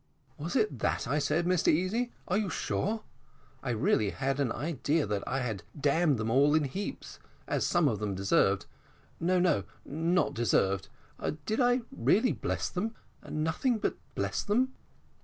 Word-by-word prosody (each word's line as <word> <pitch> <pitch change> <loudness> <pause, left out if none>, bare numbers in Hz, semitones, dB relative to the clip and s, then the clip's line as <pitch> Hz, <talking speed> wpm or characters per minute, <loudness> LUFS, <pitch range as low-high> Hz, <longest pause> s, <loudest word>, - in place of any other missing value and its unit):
"Was 160 +4 -4
it 215 - +1
that - - 0
I 145 +4 +1
said, 150 +4 +1
Mr 180 -1 +2
Easy, 205 +10 +2 0.2
are 185 - +1
you 205 -2 +1
sure? 215 +4 -1 0.6
I 135 - -4
really 110 -2 +2
had 135 +4 -1
an 135 -5 +1
idea 150 +3 0
that 100 -1 -2
I 135 +1 0
had 110 -6 -3 0.2
damned 145 0 +3
them 110 0 -1
all 140 +4 +5
in 155 - +3
heaps, 165 +9 -5 0.3
as - - 0
some - - +3
of - - 0
them 105 -2 -2
deserved 95 -1 +2 0.5
no, 180 +2 +2
no, 170 - +3 0.2
not 165 +4 +1
deserved. 100 -4 +1 0.6
Did 220 - -1
I 245 +1 +4
really 225 +6 +3
bless - - -2
them 220 +5 -3 0.3
nothing 160 - 0
but - - -1 0.2
bless - - -1
them?" 255 +6 +1
155 Hz, 160 wpm, -30 LUFS, 125-190 Hz, 0.6 s, all